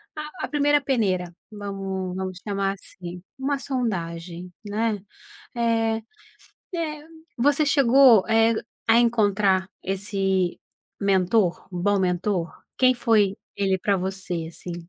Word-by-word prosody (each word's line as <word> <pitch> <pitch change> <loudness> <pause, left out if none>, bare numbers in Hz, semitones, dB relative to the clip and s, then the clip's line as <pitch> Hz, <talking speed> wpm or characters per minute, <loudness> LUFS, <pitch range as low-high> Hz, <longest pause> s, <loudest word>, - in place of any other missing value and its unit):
a 305 +3 -5
a - - -8
1ª 290 -1 +3
peneira. 205 -10 +1 0.3
Vamos 195 -3 -4
vamos 185 -1 -4
chamar 195 -1 0
assim. 180 -1 -10 0.2
Uma 275 +1 -1
sondagem, 180 -9 -4
né. 210 -1 -1 0.5
Eh 225 -1 +1 0.8
eh, 305 -2 -4 0.3
você 290 +5 +3
chegou, 265 -6 +6
eh, 225 +1 +4 0.3
a 225 +1 +6
encontrar 205 -5 +2
esse 195 -2 0 0.4
mentor, 190 -1 +2
um 175 - -4
bom 205 0 +2
mentor? 180 -1 0 0.3
Quem 255 0 +5
foi 215 -5 +2 0.2
ele 190 -1 +1
pra 200 0 +1
você, 185 -3 -3
assim? 170 +1 -7
200 Hz, 115 wpm, -24 LUFS, 185-235 Hz, 0.8 s, chegou